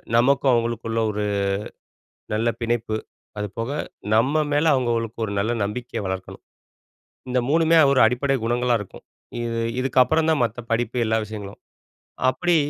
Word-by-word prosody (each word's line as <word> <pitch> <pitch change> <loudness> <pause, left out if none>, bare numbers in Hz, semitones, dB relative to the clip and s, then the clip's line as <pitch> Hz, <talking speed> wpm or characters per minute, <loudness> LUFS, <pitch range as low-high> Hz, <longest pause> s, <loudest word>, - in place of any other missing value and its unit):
நமக்கும் 135 +2 +4
அவங்களுக்குள்ள 115 -1 -1
ஒரு, 105 0 -2 1.1
நல்ல 115 +2 +1
பிணைப்பு. 115 -2 -1 0.4
அதுபோக, 115 +5 -4 0.4
நம்ம 140 +7 +3
மேல 145 +2 +2
அவங்களுக்கு 115 -3 -1
ஒரு 100 - -5
நல்ல 110 +4 0
நம்பிக்கைய 120 +2 -4
வளர்க்கணும். 95 0 -6 0.9
இந்த 125 - +2
மூணுமே 165 +1 +4
ஒரு 135 - +4
அடிப்படை 135 +4 0
குணங்களா 120 +1 +1
இருக்கும். 100 - -12 0.4
இது 115 0 -2 0.2
இதுக்கப்புறம் 135 +5 +3
தான் 155 - +1
மத்த 120 +1 -2
படிப்பு 120 +1 0
எல்லா 110 0 +1
விஷயங்களும். 105 -2 -8 0.7
அப்படி 175 +4 +1
120 Hz, 130 wpm, -23 LUFS, 110-130 Hz, 1.1 s, நமக்கும்